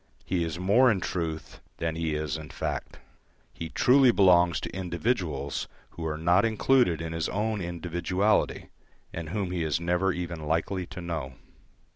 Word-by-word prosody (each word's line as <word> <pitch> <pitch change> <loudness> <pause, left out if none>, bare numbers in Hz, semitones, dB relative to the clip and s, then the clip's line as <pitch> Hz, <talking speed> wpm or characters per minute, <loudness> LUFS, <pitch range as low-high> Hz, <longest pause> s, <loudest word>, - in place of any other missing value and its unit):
He 90 -2 0
is 80 0 -3
more 105 +8 +4
in 105 -5 +2
truth 80 -3 -4 0.2
than 80 -1 -2
he 80 -2 -1
is 75 -2 -2
in 80 -2 -7
fact. - - -4 0.6
He 80 - -6
truly 130 - +5
belongs 90 -4 +4
to - - -6
individuals 85 - -2 0.2
who 80 -1 -5
are 75 -1 -2
not 85 +4 +3
included 115 - +2
in 80 0 -4
his 80 -1 -2
own 105 0 -1
individuality, 90 +4 0 0.4
and 85 -2 -5
whom 95 0 -2
he 90 -2 -1
is 80 0 0
never 90 +3 +1
even 85 -3 -5
likely 85 +3 -1
to 95 -1 -8
know. 80 -7 -4
85 Hz, 160 wpm, -27 LUFS, 80-95 Hz, 0.6 s, truly